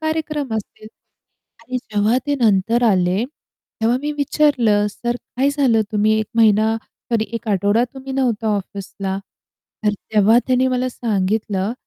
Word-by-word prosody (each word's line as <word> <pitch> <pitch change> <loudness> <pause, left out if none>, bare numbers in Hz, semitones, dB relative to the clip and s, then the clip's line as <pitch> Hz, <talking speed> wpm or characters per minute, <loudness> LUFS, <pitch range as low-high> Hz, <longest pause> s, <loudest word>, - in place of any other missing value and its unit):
कार्यक्रम 310 -5 -2
असतील 215 +1 -8 0.8
आणि 255 +2 -4
जेव्हा 215 0 0
ते 290 - +1
नंतर 225 +2 +2
आले, 190 0 +2 0.6
तेव्हा 230 +2 +2
मी 300 - -1
विचारलं, 265 -8 +2
"सर 240 +3 -3 0.2
काय 270 +3 +3
झालं 265 -6 +2
तुम्ही 210 +1 +2
1 215 - -3
महिना 220 0 +4
सॉरी 225 -2 -3
1 225 -1 -5
आठवडा 205 +4 +2
तुम्ही 265 0 -7
नव्हता 235 -5 0
ऑफिसला." 195 0 -5 0.7
तर 210 - +3 0.2
तेव्हा 215 +3 +5
त्यांनी 255 0 +2
मला 255 0 0
सांगितलं, 210 -2 -1
225 Hz, 135 wpm, -20 LUFS, 205-255 Hz, 0.8 s, तेव्हा